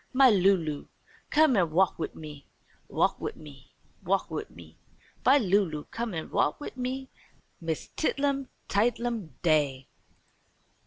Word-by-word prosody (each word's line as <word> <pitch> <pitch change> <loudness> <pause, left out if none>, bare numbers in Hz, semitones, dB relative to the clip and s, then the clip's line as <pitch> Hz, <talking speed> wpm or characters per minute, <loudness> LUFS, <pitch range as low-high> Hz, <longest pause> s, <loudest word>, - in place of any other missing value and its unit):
"My 260 -1 +7
Lulu, 180 -7 +2 0.4
come 310 -4 +5
an' 175 -4 +3
wa'k 180 +3 +2
wid - - -4
me, 150 -2 -10 0.4
wa'k - - +1
wid - - -3
me, 145 -4 -14 0.3
wa'k 195 +2 0
wid 425 - -4
me. - - -15 0.4
My 270 +3 +6
Lulu, 190 - +1
come 230 -4 -3
an' 160 - -5
wa'k 145 - +1
wid 290 - -7
me. 260 +1 -4 0.5
'Miss 165 -2 -3
Tidlum 280 -3 0 0.2
Tidelum 225 - 0
Day.'" 145 -5 +2
195 Hz, 135 wpm, -28 LUFS, 155-255 Hz, 0.5 s, My